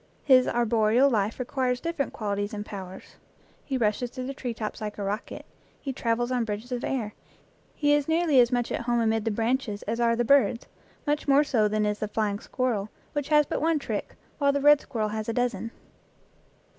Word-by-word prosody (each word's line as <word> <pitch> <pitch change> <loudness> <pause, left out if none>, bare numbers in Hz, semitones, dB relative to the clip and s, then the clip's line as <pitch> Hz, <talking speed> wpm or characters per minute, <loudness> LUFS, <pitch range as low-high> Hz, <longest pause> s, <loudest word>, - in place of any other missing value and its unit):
His 255 -3 +5
arboreal 235 +3 +3
life 210 -1 0
requires 250 0 -1
different 330 -3 -2
qual 205 -2 -3
ities 205 +2 -3
and 210 0 -5
powers; 190 -3 -9 0.5
he 270 - -2
rushes 235 +1 0
through 255 +1 -6
the 275 - -4
tree 250 -2 -4
tops 220 +1 -5
like 210 -1 -5
a 205 - -4
rocket; 205 +2 -4 0.3
he 270 - -4
travels 240 0 -1
on 250 -2 +1
bridges 220 +3 -5
of 245 0 -3
air; 225 -6 -2 0.6
he 290 -1 +2
is 290 -1 +1
nearly 320 -4 +3
as 240 0 +5
much 245 -1 0
at - - -1
home 240 0 0
amid 225 -1 +1
the - - +2
branches 225 0 -1
as 225 +3 -3
are 230 -1 +3
the 240 +1 0
birds, 245 -3 +3 0.4
much 295 0 -1
more 280 +1 +5
so 225 -7 +2
than 215 0 0
is 210 0 -1
the 215 - -2
flying 210 -1 -1
squirrel, 225 -6 -2 0.2
which 290 -1 -3
has 300 -1 +5
but - - -3
one 325 0 +2
trick, 290 - -4 0.2
while 280 -1 +4
the 280 - 0
red 295 +1 +6
squirrel 215 -3 -2
has 215 +1 -4
a - - -1
dozen. 235 -3 -1
240 Hz, 205 wpm, -27 LUFS, 215-270 Hz, 0.6 s, red